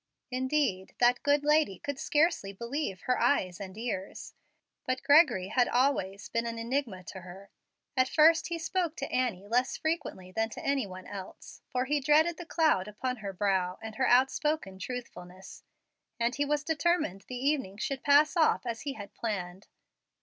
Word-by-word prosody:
Indeed, 255 -7 -1
that 245 0 +3
good 290 0 +2
lady 300 -9 +3
could 285 -1 -5
scarcely 300 - +1
believe 235 0 -4
her 250 - 0
eyes 185 -11 +1
and 195 0 -8
ears; 215 -5 -5 0.5
but 255 0 -2
Gregory 285 - +5
had 245 +2 +3
always 240 -7 0
been 230 0 -1
an 230 0 -4
enigma 230 -5 -2
to 185 +3 -9
her. 185 +3 -12 0.4
At 255 -1 +3
first 320 +1 +5
he 340 - -3
spoke 330 0 -1
to - - -5
Annie 230 -7 -1
less 245 +4 +1
frequently 290 - -3
than 225 +3 -1
to - - -9
any 275 -5 +1
one 185 0 -10
else, 195 -2 -9
for 250 0 0
he 295 +2 +1
dreaded 310 +4 +3
the 350 - -9
cloud 310 - +2
upon 250 +5 -3
her 205 -3 -5
brow 190 -2 0
and 220 -1 -8
her 260 - +2
outspoken 265 -4 +2
truthfulness, 190 -5 -8 0.6
and 235 +1 +1
he 290 - 0
was 295 0 0
determined 305 - 0
the 250 - -6
evening 260 -7 -1
should 270 +5 -3
pass 290 +4 +4
off 320 -5 +3
as 230 -2 -4
he 280 -1 -4
had 205 -5 -10
planned. 190 -4 -4
250 Hz, 170 wpm, -30 LUFS, 195-290 Hz, 0.6 s, Gregory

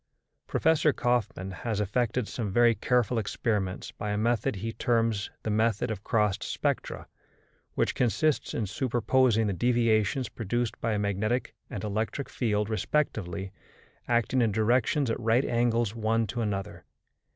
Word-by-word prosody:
Professor 160 -1 +3
Kaufmann 110 -7 -1
has 105 +3 -3
effected 115 +3 0
some 110 -4 -3
very 120 +3 +5
careful 125 0 +1
experiments 105 -2 -2
by 105 - -5
a 105 - 0
method 110 -1 +1
he 110 +4 -4
terms 115 -3 0
the 110 - -1
method 110 +2 +1
of 105 -2 -5
crossed 105 -3 +1
spectra, - - -2 0.7
which - - +1
consists 130 +6 +1
in 110 - 0
superposing 120 +1 +2
the 100 - 0
deviations 115 +2 +2
produced 120 +1 -3
by 115 -1 0
a - - 0
magnetic 105 +4 -1 0.2
and 105 -8 -5
an 105 - -3
electric 110 +6 -2
field 105 -4 0
respectively 105 - -1 0.6
acting 120 +2 +2
in 115 -2 +2
directions 120 +5 +2
at - - -2
right 115 +3 +2
angles 120 -2 +1
one 115 0 +1
to 120 +2 -3
another. 100 -3 -3
115 Hz, 145 wpm, -28 LUFS, 105-120 Hz, 0.7 s, very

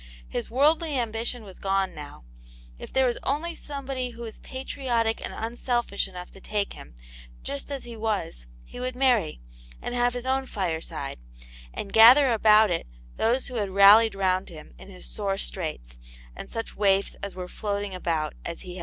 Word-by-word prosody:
His - - -4
worldly 300 +4 +3
ambition 230 0 -1
was 195 -3 -12
gone 195 -1 0
now; 145 - -10 0.6
if - - -9
there 265 0 +3
was 240 -1 0
only 310 +5 -1
somebody 270 -4 -4
who 235 0 -9
wa? 225 - -5
patriotic 250 -4 -1
and - - -4
unselfish 235 -2 -1
enough 180 -1 -9
to 195 - -14
take 205 -1 -2
him, - - -12 0.5
just 140 - -4
as 275 -2 -4
he 235 -1 -8
was, 210 - -3 0.2
he - - -10
would 255 0 -3
marry, 245 - +2 0.4
and - - -5
have 245 0 +1
his 245 0 -4
own 265 0 0
fireside, 160 - -3 0.5
and 200 - -6
gather 245 +4 +8
about 215 -2 +6
it 170 - -1 0.3
those 240 +4 +2
who 250 - -4
had 205 -3 -1
rallied 200 +3 +7
round 185 -1 +1
him 155 -3 -12
in - - -12
his 185 -2 -9
sore 200 -2 -2
straits, 150 - -4 0.4
and - - -8
such 225 0 -5
waifs 200 -1 +2
as 200 -2 -5
were 180 -1 -5
floating 200 0 -3
about 165 -4 -1
as 170 - -5
Vv^ 185 - -9
Vv;v. 180 +1 -7
215 Hz, 180 wpm, -26 LUFS, 185-245 Hz, 0.6 s, gather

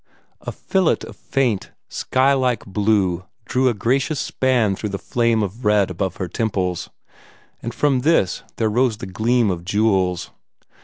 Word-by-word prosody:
A - - -5
fillet 190 -4 0
of - - -11
faint, 125 -8 -1
sky 130 +2 +1
like 130 -4 0
blue 100 -3 +1 0.2
drew 130 0 +2
a 120 - -1
gracious 135 +8 0
span 125 -9 +1
through 105 - -4
the 100 - -3
flame 115 0 +1
of 105 +5 -5
red 105 -3 +3
above 95 0 -2
her 95 - -4
temples, 95 -3 -2 0.7
and 120 - -4
from 135 +1 +1
this 140 - +2
there 110 - +1
rose 120 +1 +1
the - - -7
gleam 110 +3 +1
of 85 -1 -4
jewels. 95 -3 +1
110 Hz, 155 wpm, -21 LUFS, 95-125 Hz, 0.7 s, red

